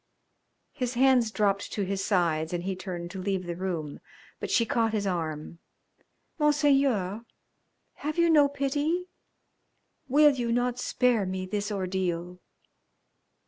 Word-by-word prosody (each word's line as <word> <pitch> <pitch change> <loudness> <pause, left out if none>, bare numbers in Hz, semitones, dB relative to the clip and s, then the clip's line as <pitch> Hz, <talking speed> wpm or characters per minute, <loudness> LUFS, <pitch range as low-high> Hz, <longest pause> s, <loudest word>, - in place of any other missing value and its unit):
His 250 -3 -3
hands 255 -2 +4
dropped 200 -2 0
to 205 - -1
his 195 0 -2
sides 170 -5 +1
and 175 0 -2
he 190 0 -2
turned 180 -2 -6
to 190 -1 -6
leave 190 -1 -2
the 175 -1 -4
room, 170 -5 -4 0.4
but - - -4
she 230 - +3
caught 230 -4 +1
his 205 -2 0
arm. 165 -3 -3 0.8
"Monseigneur! 275 -9 +2 0.7
Have 305 +3 -4
you 340 0 +4
no 295 -3 +6
pity? 290 +6 -1 1.0
Will 295 +3 +6
you 245 -4 -2
not 245 +1 0
spare 245 -6 +1
me 185 0 -3
this 205 +2 -3
ordeal?" 180 -2 -2
205 Hz, 135 wpm, -27 LUFS, 185-265 Hz, 1.0 s, no